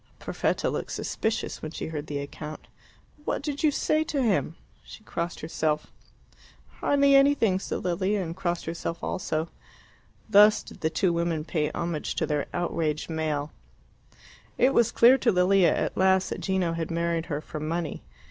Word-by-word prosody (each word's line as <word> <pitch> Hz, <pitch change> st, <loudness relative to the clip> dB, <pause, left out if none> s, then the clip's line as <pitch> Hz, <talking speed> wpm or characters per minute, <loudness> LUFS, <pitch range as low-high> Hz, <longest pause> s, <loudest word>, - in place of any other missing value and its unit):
Perfetta -, -, -1 dB
looked -, -, -4 dB
suspicious 220 Hz, 0 st, -2 dB
when 155 Hz, -, -5 dB
she 160 Hz, -, -5 dB
heard 155 Hz, -2 st, -5 dB
the 145 Hz, -, -3 dB
account. 150 Hz, +2 st, -7 dB, 0.6 s
"What -, -, -2 dB
did 285 Hz, -1 st, -3 dB
you 310 Hz, -, +4 dB
say 310 Hz, +2 st, +1 dB
to 285 Hz, -3 st, -1 dB
him?" 195 Hz, -7 st, +1 dB, 0.3 s
She 215 Hz, -, -13 dB
crossed 170 Hz, -4 st, -4 dB
herself. 155 Hz, -1 st, -2 dB, 0.9 s
"Hardly 280 Hz, -1 st, +3 dB
anything," 275 Hz, -9 st, +4 dB
said -, -, -4 dB
Lilia 190 Hz, +3 st, 0 dB
and 165 Hz, -1 st, -5 dB
crossed 175 Hz, -2 st, -2 dB
herself 165 Hz, 0 st, -4 dB
also. 160 Hz, -2 st, -2 dB, 0.8 s
Thus 210 Hz, 0 st, +6 dB
did -, -, -13 dB
the 160 Hz, -, +1 dB
two 170 Hz, +3 st, +1 dB
women 170 Hz, -2 st, -1 dB
pay 155 Hz, -3 st, 0 dB
homage 170 Hz, -3 st, -3 dB
to -, -, 0 dB
their 150 Hz, -1 st, -1 dB
outraged 165 Hz, -3 st, -2 dB
male. 155 Hz, -2 st, -2 dB, 1.1 s
It 260 Hz, +2 st, +4 dB
was 235 Hz, -2 st, +3 dB
clear 250 Hz, +3 st, +6 dB
to -, -, +3 dB
Lilia 185 Hz, 0 st, +4 dB
at -, -, -1 dB
last 190 Hz, 0 st, +3 dB
that -, -, -4 dB
Gino 190 Hz, -3 st, 0 dB
had 165 Hz, -1 st, -3 dB
married 170 Hz, 0 st, -1 dB
her 145 Hz, -2 st, -2 dB
for 155 Hz, 0 st, -7 dB
money. 160 Hz, +1 st, -3 dB
170 Hz, 165 wpm, -27 LUFS, 160-205 Hz, 1.1 s, Thus